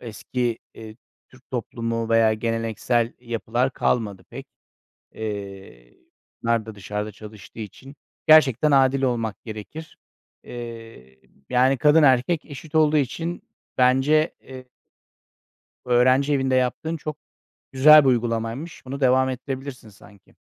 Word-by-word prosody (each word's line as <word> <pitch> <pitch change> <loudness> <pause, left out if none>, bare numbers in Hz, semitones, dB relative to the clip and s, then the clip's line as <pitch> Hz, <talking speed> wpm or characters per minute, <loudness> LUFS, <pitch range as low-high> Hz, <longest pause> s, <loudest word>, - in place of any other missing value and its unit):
Eski, 120 +1 -3 0.2
eee, 110 -1 -11 0.3
Türk 130 0 -22
toplumu 115 -2 -3
veya 115 -1 +3
geleneksel 115 +1 -1
yapılar 120 +1 -2
kalmadı 100 -6 -1
pek 135 +3 -9 0.7
eee, 100 - -8 0.5
kadınlar 115 -1 0
da 110 - -8
dışarıda 105 +1 -5
çalıştığı 105 +1 -13
için. 130 +6 -10 0.3
Gerçekten 150 -2 +5
adil 135 -1 +3
olmak 115 -5 -2
gerekir. 115 +9 -9 0.5
Eee, 115 - -10 0.3
yani, 130 +2 +3
kadın 150 +3 +5
erkek 145 +4 +3
eşit 150 +2 -11
olduğu 155 -1 +4
için 165 +5 -2 0.4
bence, 135 +5 +3
eee 130 -1 -12 1.2
öğrenci 130 +4 +3
evinde 135 -2 +1
yaptığın 130 +6 -1
çok 150 0 -6 0.5
güzel 150 +3 +8
bir 135 - +3
uygulamaymış. 120 +5 -2
Bunu 140 +2 -6
devam 130 0 +3
ettirebilirsin 130 -1 -6
sanki. 100 -1 -20
125 Hz, 115 wpm, -23 LUFS, 115-135 Hz, 1.2 s, güzel